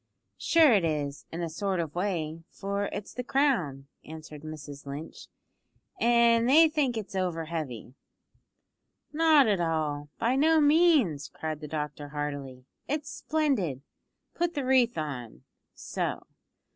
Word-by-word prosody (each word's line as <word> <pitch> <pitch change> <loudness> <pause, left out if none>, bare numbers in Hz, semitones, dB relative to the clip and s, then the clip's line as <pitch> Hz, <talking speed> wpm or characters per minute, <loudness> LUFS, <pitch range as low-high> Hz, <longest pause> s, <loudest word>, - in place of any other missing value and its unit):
"Sure 320 -6 +5
it 200 -4 +3
is, 145 -3 -2
in 170 +1 -4
a - - -1
sort 190 +2 -2
of 160 -3 -3
way, 165 -4 -2
for 200 +1 -3
it's 200 0 -6
the 250 - -4
crown," 235 - +1 0.2
answered 155 -1 -10
Mrs 145 -2 -9
Lynch, 145 +3 -8 0.7
"an' 235 0 +4
they 315 +5 +7
think 285 -6 0
it's 210 -1 -6
over 175 -3 -1
heavy." 140 -8 -5 1.2
"Not 310 -3 +5
at 200 -4 +2
all; 150 -3 -1
by 240 +3 +1
no 315 +3 +4
means," 290 - +3
cried 155 -1 -5
the 150 - -6
doctor 150 -1 -5
heartily. 140 -3 -5 0.2
"It's 295 -1 -3
splendid. 250 - -1 0.5
Put 345 0 -1
the 280 -3 -2
wreath 255 -5 +3
on 135 -7 -5 0.3
so. - - -4
175 Hz, 135 wpm, -28 LUFS, -, 1.2 s, they